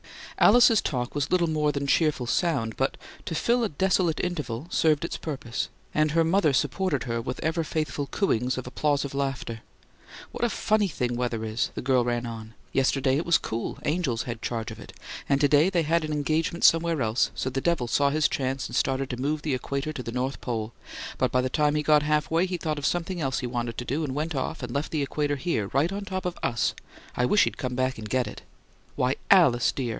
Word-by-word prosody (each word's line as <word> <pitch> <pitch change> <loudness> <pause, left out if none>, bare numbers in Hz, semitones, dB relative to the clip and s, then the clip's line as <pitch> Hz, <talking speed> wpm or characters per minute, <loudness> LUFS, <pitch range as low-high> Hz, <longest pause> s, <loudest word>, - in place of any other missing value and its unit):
Alice's 230 -1 +6
talk 125 -3 -2
was 145 -1 -1
little 175 -2 +2
more 155 -2 +1
than 140 0 -3
cheerful 150 -3 +2
sound, 120 -5 0
but, 135 - -1 0.3
to 165 - -3
fill 235 +8 +2
a 220 - 0
desolate 180 +1 +1
interval, 150 -8 -3
served 155 0 +2
its - - -4
purpose; 135 -6 -4 0.2
and 155 0 +2
her 165 +1 +3
mother 165 -1 +3
supported 150 +3 0
her 115 -2 -2
with 125 +2 -5
ever 160 +1 0
faithful 155 -2 -2
cooings 130 - 0
of 130 - -4
applausive 140 +2 -1
laughter. 135 -5 -3 0.7
"What - - -5
a 240 - +3
funny 215 -2 +1
thing 125 -7 -2
weather 120 -2 -2
is!" 110 +1 -1
the - - -4
girl 130 -1 +3
ran 120 0 -1
on. 110 -1 -8 0.2
"Yesterday 135 0 +2
it 160 - -2
was 170 - +5
cool 115 +1 -4
angels 150 -8 0
had 120 -2 -6
charge 115 -1 -3
of 110 - -9
it - - -11 0.4
and 140 -1 +3
to 145 - +4
day 150 +5 +4
they 175 -4 +1
had 165 +2 +1
an 155 - -3
engagement 155 +3 -1
somewhere 165 -4 +4
else, 110 +3 +1
so 130 - -2
the 135 +1 -2
devil 165 -7 +1
saw 140 +4 +3
his 150 +1 +2
chance 135 0 -2
and 120 - -6
started 135 +2 0
to 125 0 -4
move 150 +2 -1
the 150 - -1
equator 140 +4 -3
to 135 - -5
the 120 - -5
North 130 +3 -2
Pole; 115 -2 -3 0.5
but - - +2
by 125 - +3
the 130 - -1
time 150 +1 +2
he 150 - 0
got 150 0 +5
half 150 +1 0
way, 170 +3 +2
he 180 -1 -2
thought 155 -3 -2
of 140 - 0
something 175 0 -2
else 135 -2 0
he 125 - -3
wanted 120 -2 -3
to 120 - -4
do, 145 +6 -1
and 135 -3 -3
went 155 +3 -2
off; 130 -2 -3
and 120 -1 -5
left 140 +2 -1
the 155 -3 0
equator 145 +1 -1
here, 130 - -1
right 140 - +1
on 200 +1 -4
top 190 -2 -4
of 180 - -2
US! 120 -2 0 0.4
I 125 - +2
wish 210 - +5
he'd - - -2
come 125 -2 -3
back 130 -1 -1
and 105 -1 -7
get 130 +1 +1
it!" - - -8 0.5
"Why, 130 +2 +1
Alice 140 -11 +5
dear!" 130 -3 -3
140 Hz, 230 wpm, -26 LUFS, 125-160 Hz, 0.7 s, Alice's